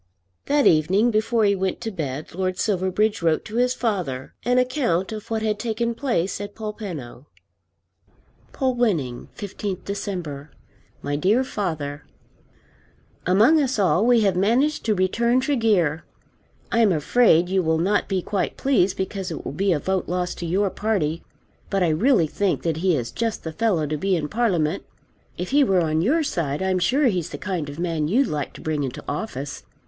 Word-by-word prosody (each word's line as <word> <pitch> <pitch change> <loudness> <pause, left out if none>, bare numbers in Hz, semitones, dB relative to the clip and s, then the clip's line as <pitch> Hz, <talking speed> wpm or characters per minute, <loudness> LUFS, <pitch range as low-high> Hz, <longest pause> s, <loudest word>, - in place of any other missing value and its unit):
That 290 -1 +3
evening 190 +9 +4
before 220 +1 +2
he 200 - +4
went 190 -1 -2
to 225 - -3
bed 150 -6 -5
Lord 185 +1 -2
Silverbridge 195 +2 0
wrote 165 -2 +1
to 220 +1 -5
his 250 +1 +2
father 180 - -2
an 250 +1 +2
account 250 - +1
of 215 -1 -7
what 220 -1 -1
had 210 -1 0
taken 235 0 -1
place 230 -8 -1
at 205 0 -7
Polpenno. 185 - -7 1.2
Polwenning, 220 - 0
15th 195 -1 -5
December. 175 -8 -5 0.5
MY 145 0 -1
DEAR 205 - +3
FATHER, 155 - -4 1.2
Among 220 - +5
us 270 -3 0
all 195 -1 +3
we 240 -1 +4
have 195 -3 +2
managed 240 +11 +2
to 215 -2 +2
return 235 +7 +2
Tregear. 215 - +1 0.7
I 230 - +2
am 220 -4 +5
afraid 170 +2 +4
you 190 +1 +1
will 160 -2 +1
not 195 +5 +1
be 190 -3 0
quite 200 -2 -2
pleased 225 -9 +2
because 190 0 -3
it 165 - -6
will - - -3
be 190 +7 0
a 165 - +3
vote 190 +4 -2
lost 180 0 -2
to 170 - -4
your 195 +3 +1
party. 175 -7 -1 0.5
But 195 -2 +1
I 170 - +2
really 180 - +3
think 195 +5 -1
that 165 -2 0
he 180 0 +2
is 120 -4 -3
just 230 -2 -2
the 160 - -5
fellow 210 -8 +1
to 150 +1 -2
be 190 +4 +1
in 150 -3 -2
Parliament. 190 -7 0 0.5
If 180 +1 -4
he 285 +1 +5
were 190 -8 +3
on 160 -1 +1
your 305 - +2
side 160 - -2
I'm 190 -1 +1
sure 270 +10 +2
he's 185 -9 +1
the - - -6
kind 180 -7 -3
of 145 - -8
man 165 -3 -1
you'd 250 - +3
like 150 - -3
to - - -11
bring 155 -2 -1
into 130 -3 -4
office. 140 - -4
190 Hz, 180 wpm, -23 LUFS, 165-225 Hz, 1.2 s, Among